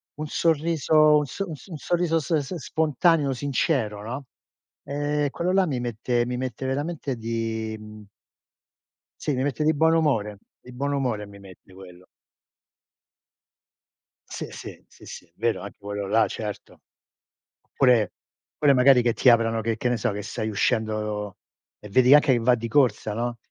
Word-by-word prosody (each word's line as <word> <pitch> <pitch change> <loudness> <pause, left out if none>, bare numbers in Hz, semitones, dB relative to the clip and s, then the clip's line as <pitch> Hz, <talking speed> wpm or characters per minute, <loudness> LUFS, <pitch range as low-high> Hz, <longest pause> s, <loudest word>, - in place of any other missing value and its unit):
un 155 +1 -5
sorriso 155 -1 +3
un 150 - +1
so 195 +7 -5
un 155 - -5 0.2
sorriso 170 +1 0
s 160 +2 -1
s 145 +3 -4
spontaneo, 155 -1 +1
sincero, 130 -5 -1
no; 130 +6 -6 0.6
ehm, 145 0 -1
quello 175 +5 -1
là 190 0 +4
mi 140 -7 -2
mette 120 0 -1
mi 125 0 -3
mette 130 0 -4
veramente 145 -1 -3
di, 110 -1 -3
mhmm 105 0 -12 1.1
sì 150 - -1
mi 130 0 -1
mette 145 +2 -1
di 155 +1 +3
buon 160 +2 +3
umore, 110 -11 0 0.2
di 125 - -14
buon 140 +3 -2
umore 125 -7 -1
mi 100 0 -14
mette 95 -1 -16
quello. 90 -1 -14 2.2
Sì, - - -6
sì. - - -10
Sì, - - -18
sì. 85 - -11
Vero 115 +1 -1
anche 100 - -9
quello 100 0 -5
là, 110 +3 +3
certo. 105 -2 -7 1.0
Pure 125 -7 +4 0.5
pure 145 -2 +4
magari 125 0 +6
che 120 -1 +1
ti 125 - +4
aprano 115 -1 +3
che 115 0 -2
che 125 - -1
ne 120 - 0
so, 120 -1 -1
che 105 - -5
stai 110 +1 -4
uscendo 105 -2 -1 0.4
e 105 - -11
vedi 125 +6 +5
anche 150 -1 +6
che 120 - +2
va 120 +2 +3
di 115 0 -5
corsa, 115 -4 +1
no; 120 +2 -3
125 Hz, 160 wpm, -24 LUFS, 110-145 Hz, 2.2 s, magari